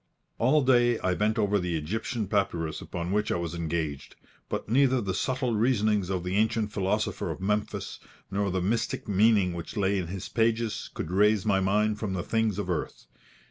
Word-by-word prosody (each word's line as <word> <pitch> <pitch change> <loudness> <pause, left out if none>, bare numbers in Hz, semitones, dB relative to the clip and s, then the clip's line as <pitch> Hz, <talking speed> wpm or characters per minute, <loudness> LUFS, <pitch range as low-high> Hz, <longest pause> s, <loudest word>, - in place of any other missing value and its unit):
All 140 +5 +4
day 120 -2 +4
I 95 -3 0
bent 105 +4 0
over 105 -1 +2
the 90 -2 -1
Egyptian 110 +7 -3
papyrus 85 -6 -1
upon 85 0 -4
which 105 +1 0
I - - +1
was 85 -1 -3
engaged; 80 -4 -3 0.3
but - - -3
neither 130 +3 +3
the 95 -5 -2
subtle 130 +3 -1
reasonings 105 -4 +2
of 95 -2 -1
the 90 +2 -1
ancient 110 0 +1
philosopher 105 +2 -1
of - - -4
Memphis, 105 +2 -2 0.3
nor 100 0 0
the 90 -1 -1
mystic 110 +5 -1
meaning 100 -2 +3
which 85 +6 -7
lay 100 0 +1
in 90 - -3
his 95 +1 -5
pages, 115 -1 0
could 80 - -4
raise 105 +1 +3
my 100 -3 +3
mind 105 +2 +1
from 105 -4 -2
the 90 -2 -2
things 110 -2 0
of 105 - -3
earth. 90 -7 -3
105 Hz, 185 wpm, -28 LUFS, 90-110 Hz, 0.3 s, All